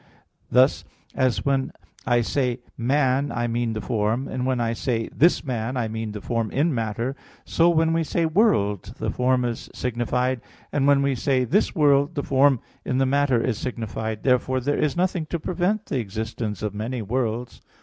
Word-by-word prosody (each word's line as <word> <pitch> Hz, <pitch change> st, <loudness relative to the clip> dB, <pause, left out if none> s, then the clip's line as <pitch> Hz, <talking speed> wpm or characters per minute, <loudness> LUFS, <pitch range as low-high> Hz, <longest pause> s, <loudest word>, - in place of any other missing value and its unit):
Thus 130 Hz, +3 st, +4 dB, 0.3 s
as 130 Hz, -3 st, 0 dB
when 135 Hz, -1 st, +1 dB, 0.4 s
I 120 Hz, -1 st, +3 dB
say 125 Hz, 0 st, -1 dB
"man" 135 Hz, +2 st, +1 dB
I 120 Hz, 0 st, -1 dB
mean 120 Hz, -1 st, -1 dB
the 110 Hz, -, -4 dB
form, 115 Hz, +3 st, -1 dB
and 130 Hz, 0 st, -3 dB
when 130 Hz, -2 st, 0 dB
I 115 Hz, -1 st, 0 dB
say 115 Hz, -1 st, -2 dB
"this 170 Hz, +4 st, +4 dB
man," 125 Hz, -1 st, -2 dB
I 120 Hz, -3 st, 0 dB
mean 110 Hz, 0 st, -4 dB
the 105 Hz, -, -6 dB
form 115 Hz, -1 st, -1 dB
in 150 Hz, +7 st, +1 dB
matter; 115 Hz, +2 st, -2 dB, 0.3 s
so 170 Hz, +1 st, +3 dB
when 165 Hz, -1 st, +3 dB
we 165 Hz, 0 st, +1 dB
say 165 Hz, +2 st, 0 dB
"world," 110 Hz, -, +1 dB
the -, -, -2 dB
form 125 Hz, 0 st, +1 dB
is 120 Hz, -1 st, -4 dB
signified, 125 Hz, +1 st, -1 dB, 0.3 s
and 140 Hz, -1 st, +1 dB
when 140 Hz, -1 st, +5 dB
we 140 Hz, 0 st, +2 dB
say 130 Hz, +1 st, +1 dB
"this 200 Hz, -, +1 dB
world," 145 Hz, 0 st, +3 dB
the 145 Hz, -, -1 dB
form 135 Hz, -2 st, +3 dB, 0.2 s
in 130 Hz, -, -1 dB
the 135 Hz, -, +3 dB
matter 140 Hz, -2 st, +2 dB
is 115 Hz, -3 st, -1 dB
signified. 110 Hz, -3 st, -4 dB
Therefore 130 Hz, 0 st, +2 dB
there 145 Hz, +3 st, -1 dB
is 150 Hz, +2 st, 0 dB
nothing 175 Hz, -3 st, 0 dB
to 170 Hz, -, -3 dB
prevent 185 Hz, +6 st, -1 dB
the 135 Hz, -, -2 dB
existence 110 Hz, 0 st, -4 dB
of 105 Hz, -2 st, -2 dB
many 115 Hz, +3 st, -3 dB
worlds. 120 Hz, +1 st, -2 dB
125 Hz, 185 wpm, -24 LUFS, 115-140 Hz, 0.4 s, when